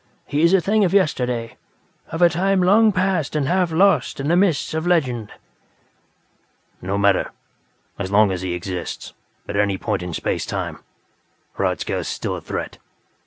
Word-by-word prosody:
"He 145 +1 -1
is 170 +1 +5
a - - +5
thing 210 +5 +2
of 190 0 +1
yesterday; 125 -10 0 0.5
of 165 +2 -1
a 175 - +7
time 185 +3 +1
long 215 +4 +5
past 185 -6 0
and 145 -3 0
half 180 0 +1
lost 160 -6 +2
in 140 +2 -2
the 170 - +4
mists 180 -6 +1
of 160 +2 -2
legend." 125 -11 0 1.5
"No 95 +2 -2
matter. 100 -1 +2 0.7
As 95 -2 -3
long 100 0 +4
as 90 -1 -3
he 90 -2 -3
exists, 90 0 -5 0.3
at 100 - -5
any 100 -1 +1
point 105 -1 -2
in 90 0 -5
space - - -2
time, - - -4 0.7
Hradzka - - -1
is - - -4
still - - -3
a - - -7
threat. - - -5
150 Hz, 165 wpm, -21 LUFS, -, 1.5 s, a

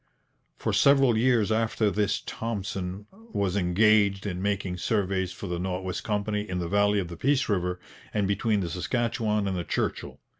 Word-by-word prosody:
For - - -2
several 135 -4 +5
years 115 -2 +3
after 110 -1 +1
this 105 0 0
Thompson 100 -3 -4
was 190 - -3
engaged 100 +1 +3
in 90 -3 -3
making 95 -2 -1
surveys 95 -2 0
for 95 - -8
the 90 -2 -3
North 90 +1 -3
West 95 -1 -4
Company 105 0 -1
in 90 - -2
the 85 -1 -2
valley 100 +2 +3
of 95 -3 -1
the 85 - -8
Peace 140 - +1
river 90 -3 -1 0.3
and 105 -2 0
between 105 +1 +1
the 85 - -3
Saskatchewan 110 +2 -1
and 95 - -1
the 90 - -2
Churchill. - - -3
100 Hz, 175 wpm, -27 LUFS, 95-110 Hz, 0.3 s, several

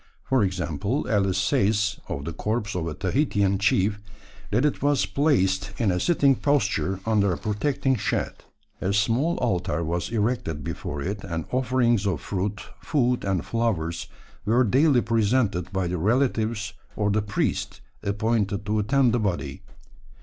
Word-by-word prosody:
For 130 -4 +2
example, 95 - -1
Ellis 95 -4 +1
says 105 +2 +1
of 70 - -4
the 85 - -4
corpse 105 +1 -2
of 85 -2 -2
a 75 - -4
Tahitian 100 -3 +1
chief, 100 +1 +2 0.5
that 115 +7 +2
it 150 - 0
was 145 0 +2
placed 100 -9 +1
in 110 -5 +2
a 90 - 0
sitting 140 - +3
posture 105 -9 0
under 105 -3 +2
a 90 - -1
protecting 130 +5 0
shed; - - -1 0.5
"a 95 - 0
small 120 +11 +1
altar 95 -7 0
was 85 +2 -2
erected 105 - -1
before 70 +1 -4
it, 100 +3 -4
and 80 -2 -4
offerings 120 -4 +2
of 90 -7 0
fruit, 100 +6 -3 0.2
food, 125 -4 0
and 95 -5 -1
flowers 100 -8 -1 0.4
were 120 +5 +3
daily 130 +3 +4
presented 110 -5 +1
by 95 -2 -1
the 90 0 -2
relatives 110 - 0 0.2
or 105 -1 +1
the 105 +1 +2
priest 105 -1 -2 0.2
appointed 105 -1 0
to 105 +1 0
attend 125 +3 +3
the 120 - +2
body." 90 -6 -2
105 Hz, 150 wpm, -25 LUFS, 95-120 Hz, 0.5 s, daily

